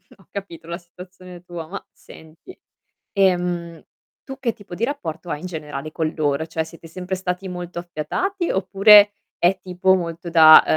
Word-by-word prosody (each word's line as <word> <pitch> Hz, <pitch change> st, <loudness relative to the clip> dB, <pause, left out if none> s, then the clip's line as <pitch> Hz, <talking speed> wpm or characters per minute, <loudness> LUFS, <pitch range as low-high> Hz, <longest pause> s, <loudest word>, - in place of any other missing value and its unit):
Ho 195 Hz, -3 st, -24 dB
capito 190 Hz, -5 st, -8 dB
la 170 Hz, 0 st, -4 dB
situazione 180 Hz, 0 st, -13 dB
tua, 175 Hz, -3 st, -7 dB
ma 195 Hz, +4 st, -7 dB
senti: 160 Hz, -, -15 dB, 0.6 s
ehm, 175 Hz, -4 st, +1 dB, 0.4 s
tu 270 Hz, -2 st, -8 dB
che 235 Hz, -4 st, 0 dB
tipo 205 Hz, -5 st, -11 dB
di 220 Hz, -, -4 dB
rapporto 175 Hz, -, -3 dB
hai 150 Hz, -, -2 dB
in 175 Hz, -, -8 dB
generale 155 Hz, -3 st, -6 dB
con 155 Hz, 0 st, -2 dB
loro? 150 Hz, 0 st, 0 dB
Cioè, 160 Hz, 0 st, -2 dB
siete 165 Hz, +1 st, -13 dB
sempre 180 Hz, +3 st, -4 dB
stati 185 Hz, 0 st, -3 dB
molto 180 Hz, -1 st, -6 dB
affiatati, 335 Hz, -, -2 dB
oppure 200 Hz, +2 st, +6 dB, 0.3 s
è 180 Hz, +3 st, +3 dB
tipo 185 Hz, +1 st, +2 dB
molto 170 Hz, -1 st, -4 dB
da 160 Hz, -2 st, +9 dB
175 Hz, 160 wpm, -22 LUFS, 165-190 Hz, 0.6 s, da